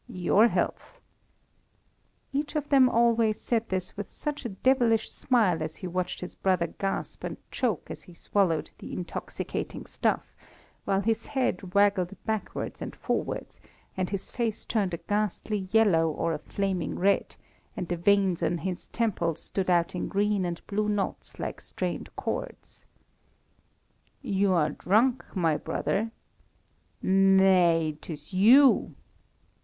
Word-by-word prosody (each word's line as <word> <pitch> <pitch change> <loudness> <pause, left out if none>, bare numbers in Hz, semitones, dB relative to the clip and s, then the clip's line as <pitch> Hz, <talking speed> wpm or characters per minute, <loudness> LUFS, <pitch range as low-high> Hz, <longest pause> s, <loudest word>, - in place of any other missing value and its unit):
"Your 190 +5 +3
health!" - - -2 1.3
Each 290 +2 -2
of 295 -1 -2
them 265 -3 +6
always 230 -2 +3
said 230 -1 -1
this 185 -1 -3
with 205 -1 -6
such 295 -3 -5
a - - -1
devilish 230 +1 +2
smile 210 -10 +2
as 155 0 -4
he 190 - -8
watched 180 +1 -3
his 180 - -6
brother 185 -3 +1
gasp 195 +3 -4
and - - -4
choke 230 - -1
as - - -7
he 175 - -15
swallowed 165 -4 0
the - - -8
intoxicating 180 -1 -5
stuff, - - -1 0.5
while 195 -1 +1
his 225 +2 -1
head 200 -9 -2
waggled 200 -2 +3
backwards 220 -2 -3
and - - -5
forwards, - - -3 0.3
and 185 -1 -1
his 200 -2 -4
face 230 -3 -2
turned 200 -6 0
a - - -7
ghastly 205 0 -2
yellow 195 -8 +4
or 165 +2 -1
a 150 - -3
flaming 190 +1 -2
red, 195 +2 +1 0.4
and 180 - -3
the 175 - -1
veins 190 0 +2
on 175 - +1
his 180 +1 -4
temples 175 -8 -1
stood 190 -2 -2
out 170 -1 +2
in 180 - -3
green 205 -1 +1
and 170 -1 -5
blue 210 +1 -1
knots 205 -2 -3
like - - -5
strained - - -4
cords. - - -5 1.4
"You 195 -1 +2
are 155 -4 +2
drunk, 230 - +2
my 165 -5 +2
brother!" 220 +8 -1 0.9
"Nay, 185 -5 +4
'tis 150 +2 -9
you." 250 +9 +6
195 Hz, 140 wpm, -28 LUFS, 180-220 Hz, 1.4 s, them